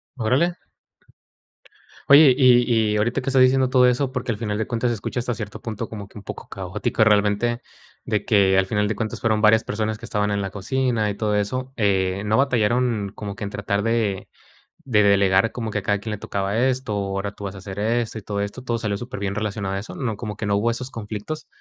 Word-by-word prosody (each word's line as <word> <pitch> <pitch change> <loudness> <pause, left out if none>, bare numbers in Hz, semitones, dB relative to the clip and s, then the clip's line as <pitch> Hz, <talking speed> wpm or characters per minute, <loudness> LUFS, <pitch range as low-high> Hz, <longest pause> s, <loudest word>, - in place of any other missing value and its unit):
Órale. 135 +9 +1 1.5
Oye, 140 -1 +9
y 120 -4 +4
y - - 0
ahorita 110 +3 +1
que 130 - -2
estás 130 -1 +4
diciendo 130 0 +4
todo 130 -1 +5
eso, 125 +2 +1
porque 125 -2 -2
al 105 - -3
final 105 -2 -3
de 110 - -1
cuentas 120 0 -1
se - - 0
escucha 110 +3 -4
hasta 120 0 -2
cierto 105 -1 -7
punto 110 0 -5
como 105 -3 -7
que 105 - -15
un 100 - -10
poco - - -8
caótico 95 +3 -1
realmente, 105 +3 +2 0.5
de 105 -2 -1
que, 95 -3 +3
al 95 - +4
final 105 +1 0
de 110 - -2
cuentas 110 +1 -4
fueron 110 -2 +1
varias 110 +1 +5
personas 110 0 -2
que 115 - -10
estaban 105 -2 -1
en 100 0 0
la 95 - -3
cocina 115 +2 -1
y 100 - -3
todo 105 -1 -1
eso, 130 +6 -2
eh, 95 -2 +1
no 110 +3 +2
batallaron 120 -5 +1
como 105 -2 -6
que 110 - -7
en 100 - -3
tratar 100 0 -2
de 110 -4 -1 0.6
de 105 -5 +3
delegar 100 +1 +4
como 115 -2 -4
que 105 - -1
a - - -7
cada 105 0 +1
quien 110 +1 -6
le 105 - -3
tocaba 100 +1 -2
esto, 130 -2 0
ahora 100 0 -2
tú 100 - -10
vas 100 -1 -4
a - - -9
hacer 95 0 -8
esto 115 +1 -1
y - - -6
todo 100 0 -4
esto, 100 +5 -5
todo 120 -2 -1
salió 105 -3 -2
superbién 100 -4 -4
relacionado 100 -2 -3
a 95 - -2
eso, 105 - -8
¿no?, 115 -5 -2
como 105 -2 -5
que - - -4
no 100 - +2
hubo 115 +3 +1
esos 125 +2 -4
conflictos, 115 +7 -6
110 Hz, 230 wpm, -23 LUFS, 100-120 Hz, 1.5 s, Oye